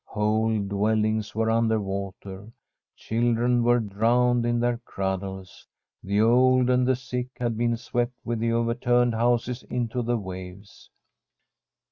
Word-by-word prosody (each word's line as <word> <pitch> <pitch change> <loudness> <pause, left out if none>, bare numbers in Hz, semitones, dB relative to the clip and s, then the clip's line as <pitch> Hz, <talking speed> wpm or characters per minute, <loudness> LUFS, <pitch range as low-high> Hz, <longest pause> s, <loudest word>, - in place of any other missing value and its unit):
Whole 110 +1 0
dwellings 110 +2 0
were 110 0 +1
under 115 -1 +2
water; 100 +1 -6 0.4
children 120 +1 +1
were 120 +1 +4
drowned 120 +3 +1
in 120 0 +1
their 120 0 0
cradles. 95 -2 -5 0.3
The 100 +2 -1
old 125 +3 +4
and 125 0 +2
the 130 - +3
sick 125 -1 -4
had 120 -2 -2
been 120 +1 0
swept 120 +1 -2
with 120 -1 -2
the 115 +1 0
overturned 120 +1 +1
houses 120 +2 0
into 125 0 -2
the 120 0 0
waves. 95 0 -9
115 Hz, 130 wpm, -25 LUFS, 105-120 Hz, 0.4 s, were